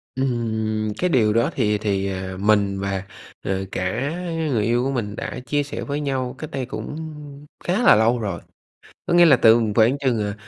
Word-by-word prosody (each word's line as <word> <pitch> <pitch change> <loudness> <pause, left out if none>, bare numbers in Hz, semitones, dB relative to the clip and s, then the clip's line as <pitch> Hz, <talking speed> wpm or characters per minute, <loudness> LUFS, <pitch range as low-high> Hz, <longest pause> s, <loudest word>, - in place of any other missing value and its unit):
Ừm, 110 -4 -1
cái 180 - +1
điều 110 -8 +3
đó 115 +1 +2
thì 105 -4 +1
thì, 100 -2 -1
à, 95 -1 -4
mình 100 -1 +2
và, 100 -1 -2 0.4
ờ, 95 0 -2
cả 115 +10 -2 0.4
người 115 -5 +1
yêu 120 +3 +1
của 135 - 0
mình 110 -6 -3
đã - - -5
chia 145 +1 0
sẻ 140 - -6
với 145 +1 -3
nhau 130 -3 -2
cách 155 - -7
đây 135 -2 -3
cũng 125 - -6 0.7
khá 190 +8 0
là - - +7
lâu 115 +3 +3
rồi. 100 -6 -4 0.6
Có - - -1
nghĩa 175 0 +7
là 150 -5 +7
từng 115 -2 +4
khoảng 115 +5 +4
chừng, 130 -5 0
à, 105 -1 -2
115 Hz, 195 wpm, -22 LUFS, 105-135 Hz, 0.7 s, là